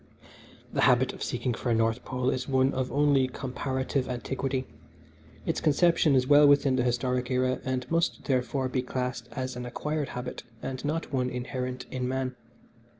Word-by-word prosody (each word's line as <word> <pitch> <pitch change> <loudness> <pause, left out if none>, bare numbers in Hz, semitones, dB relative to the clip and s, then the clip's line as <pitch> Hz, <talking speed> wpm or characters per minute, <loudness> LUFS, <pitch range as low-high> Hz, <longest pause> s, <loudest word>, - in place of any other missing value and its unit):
"The - - +1
habit - - +4
of - - -11
seeking 125 - -1
for 120 - -3
a 115 - +3
North 115 +1 +1
Pole 125 0 -1
is 125 -1 -3
one 130 0 +3
of 130 -1 -2
only 140 -2 +3
comparative 130 +1 -2
antiquity. 130 +1 -2 0.8
Its - - -1
conception 160 -1 +4
is 130 -1 +3
well 145 +1 +7
within 140 -2 +4
the 130 - +2
historic 125 0 0
era, 130 0 +1
and 130 -2 -2
must, 165 0 +1
therefore, 130 0 0
be 130 0 -1
classed 125 -1 -3
as 130 +1 -3
an 125 - -5
acquired 150 +4 -3
habit 125 - -5 0.2
and 130 -1 -4
one 155 +3 -1 0.2
not - - -2
inherent 125 0 -4
in 125 -1 -2
man. 130 0 -2
130 Hz, 170 wpm, -28 LUFS, 125-135 Hz, 0.8 s, well